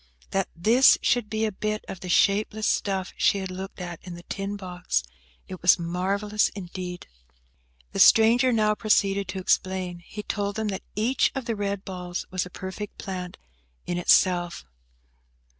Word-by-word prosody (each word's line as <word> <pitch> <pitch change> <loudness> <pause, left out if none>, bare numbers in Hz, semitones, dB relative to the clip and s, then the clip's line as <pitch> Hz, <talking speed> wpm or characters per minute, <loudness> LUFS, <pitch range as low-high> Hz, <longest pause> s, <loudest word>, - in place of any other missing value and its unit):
That 195 -1 0
this 230 +10 +5
should 240 -4 +1
be 220 +1 0
a 215 - -1
bit 215 +2 -3
of 190 - -7
the 180 - -7
shapeless 210 +4 +2
stuff 190 -2 0
she - - +3
had 190 -1 -4
looked 190 +2 -7
at 175 -2 -6
in 180 -2 -8
the 175 - -11
tin 200 +2 -4
box–it 75 - -5
was 175 +1 +6
marvellous 195 +5 0
indeed. 180 -2 -6 0.9
The - - -4
stranger 235 +3 +6
now 215 -2 +3
proceeded 200 -2 +1
to 190 +1 -4
explain. 185 -1 0
He 210 +4 -9
told 205 -1 -2
them 220 -1 -2
that 190 - -3
each 230 +6 +2
of 270 -3 -3
the 230 - -1
red 200 -1 -3
balls 180 -2 -5
was 185 -1 -1
a - - -13
perfect 190 +3 -7
plant 180 -2 -6 0.5
in 175 - -2
itself. 175 - +3
190 Hz, 160 wpm, -26 LUFS, 180-210 Hz, 0.9 s, was